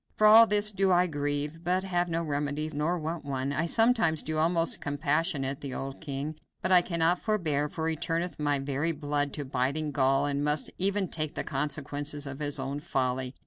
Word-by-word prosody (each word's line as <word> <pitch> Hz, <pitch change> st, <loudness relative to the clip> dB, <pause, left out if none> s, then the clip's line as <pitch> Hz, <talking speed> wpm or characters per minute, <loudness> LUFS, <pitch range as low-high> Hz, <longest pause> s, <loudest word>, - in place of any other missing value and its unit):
For 215 Hz, -, +3 dB
all 225 Hz, +2 st, +9 dB
this 210 Hz, 0 st, +3 dB
do 195 Hz, -1 st, +1 dB
I 180 Hz, 0 st, +4 dB
grieve, 145 Hz, 0 st, -3 dB
but 180 Hz, +2 st, 0 dB
have 175 Hz, -2 st, -1 dB
no 165 Hz, 0 st, -1 dB
remedy, 150 Hz, 0 st, -2 dB
nor 155 Hz, +5 st, -1 dB
want 165 Hz, +1 st, -4 dB
one. 135 Hz, 0 st, -3 dB
I 160 Hz, +3 st, 0 dB
sometimes 225 Hz, -7 st, +3 dB
do 155 Hz, 0 st, -2 dB
almost 165 Hz, +1 st, +3 dB
compassionate 145 Hz, -1 st, -1 dB
the 140 Hz, -2 st, -5 dB
old 135 Hz, 0 st, -6 dB
king, 150 Hz, 0 st, -5 dB, 0.2 s
but 185 Hz, -, 0 dB
I 180 Hz, -1 st, +8 dB
cannot 170 Hz, 0 st, +1 dB
forbear, 155 Hz, -9 st, -1 dB
for 160 Hz, -1 st, -3 dB
he 165 Hz, -, 0 dB
turneth 165 Hz, +2 st, -2 dB
my 145 Hz, -1 st, +1 dB
very 140 Hz, +4 st, -1 dB
blood 145 Hz, -1 st, -1 dB
to 145 Hz, -, -4 dB
biting 135 Hz, +4 st, -1 dB
gall, 135 Hz, 0 st, +2 dB
and 145 Hz, 0 st, -1 dB
must 150 Hz, 0 st, +1 dB
e'en 195 Hz, 0 st, +1 dB
take 155 Hz, -2 st, -3 dB
the -, -, -2 dB
consequences 145 Hz, 0 st, -3 dB
of 135 Hz, 0 st, -7 dB
his 145 Hz, -1 st, 0 dB
own 135 Hz, +1 st, -4 dB
folly. 130 Hz, -2 st, -2 dB
150 Hz, 195 wpm, -28 LUFS, 145-170 Hz, 0.2 s, all